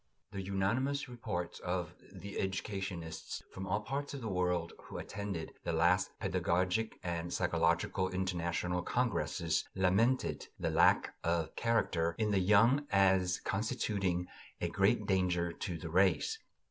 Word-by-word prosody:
The 100 -2 -4
unanimous 110 +10 0
reports 115 -8 -4
of 90 -1 -2 0.2
the 100 +1 -7
educationists 95 -4 -4
from 95 +1 -6
all 105 +3 0
parts 140 +6 -3
of 135 - -6
the 115 - -4
world 90 -3 0
who - - -7
attended 100 -5 -5
the 85 - -1
last 85 +3 +3
pedagogic 90 +6 0
and 85 -1 -3
psychological 85 +3 +1
international 90 -1 -1
congresses 90 -8 0
lamented 100 +7 +2
the - - 0
"lack - - +4
of 85 -1 0
character" 85 -8 +1
in 110 -2 +1
the 100 - +3
young 115 +9 +4
as 95 -2 +3
constituting 100 -3 -1 0.3
a - - -1
great - - +2
danger 90 -2 +1
to 85 0 -4
the 80 0 -7
race. 100 - +3
95 Hz, 135 wpm, -34 LUFS, 85-105 Hz, 0.3 s, lack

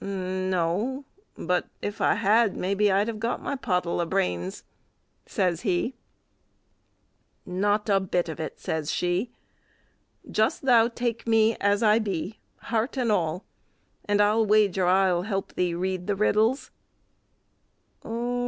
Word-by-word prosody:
"No; 185 +6 -2 0.3
but - - -1
if 205 - -5
I - - +3
had, 215 +1 +3
maybe 200 +2 +1
I'd 200 +3 +2
have 225 -2 -4
got 230 +2 -1
my - - -3
pottle 180 -9 -1
o' - - 0
brains," 90 - -2 0.6
says 175 -3 0
he. 195 +4 0 1.5
"Not 205 +4 0
a 200 -2 +3
bit 180 -2 -1
of 160 - -6
it," 160 - -5
says 155 -2 -3
she; 180 +6 -1 1.0
"just 220 +4 +1
thou 235 -4 +5
take 235 -1 -3
me 225 0 +4
as 200 +2 +1
I 215 +1 +5
be, 200 -1 -4 0.3
heart 230 +5 0
and 240 -4 +1
all, 175 -2 -1 0.6
and 205 0 +1
I'll 210 +2 +3
wager 200 -4 +3
I'll 185 -1 +3
help 195 0 -3
thee 175 -2 0
read 185 0 -3
the 205 - +1
riddles." 220 +6 +1
200 Hz, 135 wpm, -26 LUFS, 180-220 Hz, 1.5 s, thou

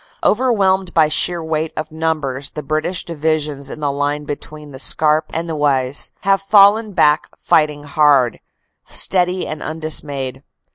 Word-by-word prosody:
Overwhelmed 195 -6 +1
by 155 -2 +4
sheer 170 +2 +2
weight 160 0 -2
of 155 +1 -4
numbers 155 -4 -2
the 150 - -7
British 155 +5 -2
Divisions 150 -3 -2
in 155 - -8
the 145 -1 0
line 145 +1 -2
between 150 0 -8
the 130 - -10
Scarpe 155 +2 +2
and 165 +1 -3
the 165 - -3
Oise 140 -2 0
have 195 0 +2
fallen 205 +2 +4
back 150 -2 +3
fighting 150 -3 +1
hard, 145 -4 +2 0.5
steady 180 0 0
and 155 - -6
undismayed. 145 -4 -3
155 Hz, 145 wpm, -18 LUFS, 145-170 Hz, 0.5 s, by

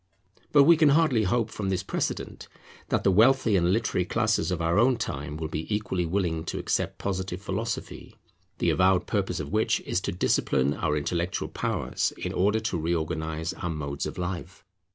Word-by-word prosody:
But 145 -2 +7
we 165 +3 +6
can 155 -2 +5
hardly 140 -7 +3
hope 115 +2 0
from 100 -2 -3
this 95 -2 -1
precedent - - -3 0.4
that - - +1
the 95 - +4
wealthy 115 +2 +4
and 90 -1 +3
literary 105 -3 +1
classes 110 +3 0
of 90 -2 -1
our 85 +4 +2
own 125 +2 +4
time 75 - -4
will 80 0 -3
be 80 +5 -5
equally 95 -4 -1
willing 85 -3 -1
to - - -4
accept - - -1
Positive 95 -2 -3
philosophy; 100 +4 -5 0.4
the - - +2
avowed 95 0 +3
purpose - - -1
of - - -5
which - - +2
is 90 - -2
to 100 - -2
discipline 70 -6 +1
our 75 -1 -1
intellectual 85 +4 -2
powers, - - -2
in - - -4
order 105 +4 +2
to 110 -6 -2
reorganize 80 0 -2
our 90 - -5
modes 70 -3 -3
of - - -7
life. 90 0 -5
95 Hz, 180 wpm, -27 LUFS, 80-110 Hz, 0.4 s, But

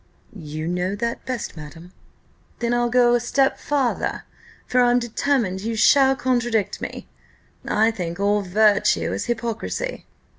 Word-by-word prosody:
"You 155 -3 -6
know 180 +3 -1
that 235 +4 -4
best, 255 -7 -4
madam!" 165 +3 -11 0.7
"Then 235 0 -1
I'll 240 0 +1
go 245 0 +4
a 240 - +3
step 270 +3 +1
farther; 275 -4 -1 0.4
for 250 - +2
I'm 245 0 +4
determined 235 -4 -1
you 225 +2 -3
shall 270 +4 +5
contradict 240 -5 -1
me: - - -6 0.6
I 220 +2 +3
think 175 -4 -5
all 205 +1 +2
virtue 205 +2 +2
is - - -3
hypocrisy." 235 - -4
230 Hz, 140 wpm, -22 LUFS, 195-245 Hz, 0.7 s, shall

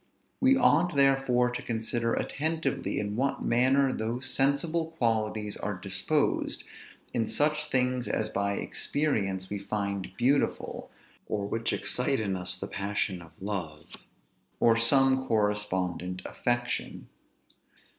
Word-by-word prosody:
We 265 +1 +5
ought, 175 - +3
therefore, 135 -3 +3
to 120 - -4
consider 115 0 -1
attentively 160 -2 -1
in 105 0 -3
what 135 +4 -1
manner 130 +3 +3
those 115 +4 -2
sensible 155 +4 +1
qualities 110 -3 0
are - - -3
disposed, - - 0 0.5
in 115 -2 0
such 150 0 +1
things 125 -1 +1
as 110 - 0
by 100 0 -1
experience 100 -8 -1
we 100 - -2
find 100 -1 -3
beautiful, 135 +4 0 0.4
or 100 -2 -2
which 115 +3 -1
excite 135 +2 0
in 100 -3 -1
us 90 0 0
the - - -4
passion 100 -2 -2
of 80 -1 -16
love, 85 -6 -5 0.6
or 115 -1 +5
some 130 +3 +3
correspondent 95 -4 -1
affection. 120 0 -2
115 Hz, 120 wpm, -28 LUFS, 100-135 Hz, 0.6 s, We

